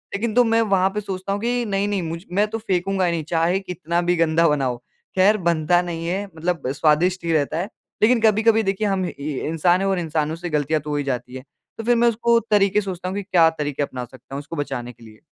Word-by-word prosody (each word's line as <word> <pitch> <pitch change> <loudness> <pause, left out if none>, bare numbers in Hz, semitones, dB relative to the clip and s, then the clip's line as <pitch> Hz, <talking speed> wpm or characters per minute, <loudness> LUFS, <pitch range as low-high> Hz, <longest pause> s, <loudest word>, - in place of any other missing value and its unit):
लेकिन 220 +2 -2
तो 245 - +6
मैं 225 0 +2
वहाँ 195 -3 +2
पे 210 - -1
सोचता 195 -1 -4
हूँ 205 - -3
कि 240 +1 0
नहीं, 200 -1 0
नहीं 205 -2 -1
मुझ 165 0 -5
मैं 205 +3 +2
तो 220 +1 -4
फेंकूँगा 195 -3 0
ही 175 - +1
नहीं 165 -2 -2
चाहे 165 +4 +1
कितना 175 -2 -2
भी 175 0 +1
गंदा 165 0 +3
बना 145 -2 +1
हो। 125 -1 -1 0.4
खैर 200 +3 +5
बनता 170 -1 +2
नहीं 165 -1 -5
है 190 +4 -1
मतलब 165 -3 -2
स्वादिष्ट 160 +6 +2
ही 165 - 0
रहता 155 0 0
है, 180 - -1 0.4
लेकिन 230 +2 +4
कभी-कभी 220 +1 +4
देखिए 195 +1 0
हम 190 -2 0
इ - - -3 0.4
इंसान 175 +4 +2
है 195 - 0
और 190 -2 +1
इंसानों 160 -2 -1
से 175 +1 -6
गलतियाँ 150 0 0
तो 150 - -8
हो 150 - -1
ही 145 - -1
जाती 125 -2 -4
हैं, 130 - -7 0.3
तो 225 - -5
फिर 240 +2 +3
मैं 235 0 +3
उसको 235 +1 +2
तरीक़े 205 0 +3
सोचता 185 -2 -5
हूँ 190 - -4
कि 205 - -3
क्या 175 -4 +4
तरीक़े 145 -1 -1
अपना 125 -3 -5
सकता 130 +2 -12
हूँ - - -3
उसको 155 +4 -8
बचाने 135 -5 -4
के 120 - -19
लिए। 110 -1 -16
175 Hz, 250 wpm, -22 LUFS, 155-200 Hz, 0.4 s, तो